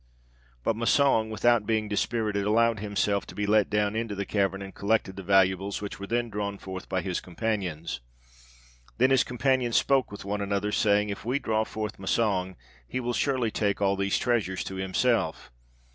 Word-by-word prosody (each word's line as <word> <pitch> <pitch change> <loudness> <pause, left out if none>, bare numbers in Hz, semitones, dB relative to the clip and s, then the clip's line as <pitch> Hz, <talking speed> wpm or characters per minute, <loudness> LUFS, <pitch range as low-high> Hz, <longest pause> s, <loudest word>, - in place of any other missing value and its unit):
But 115 - +1
Massang, 115 -1 +3
without 110 0 +2
being 110 -1 +1
dispirited, 105 0 -1
allowed 115 0 +3
himself 100 -1 0
to - - -10
be 105 - -1
let 105 0 +3
down 105 0 +1
into 110 -2 -2
the 100 0 -3
cavern, 95 -1 0
and 95 - -9
collected 100 -2 0
the 95 - -6
valuables, 95 +1 +2
which 105 -1 -6
were 100 - -6
then 120 0 -1
drawn 100 -1 -3
forth 95 -1 -8
by 95 - 0
his 95 -2 -2
companions. 90 - -3 1.0
Then 130 +3 +4
his 135 -2 +5
companions 125 -1 +1
spoke 135 -4 +2
with 100 - -8
one 100 +1 -2
another, 100 +1 -1
saying, 105 -1 +2
'If 100 - -6
we 125 +5 0
draw 110 -5 0
forth 110 -1 -5
Massang, 95 -2 0 0.3
he 130 - -3
will 120 -1 -2
surely 125 -2 0
take 100 -2 0
all 100 -1 +2
these 100 0 0
treasures 110 -7 0
to 95 - -6
himself. 95 - 0
105 Hz, 180 wpm, -27 LUFS, 100-115 Hz, 1.0 s, his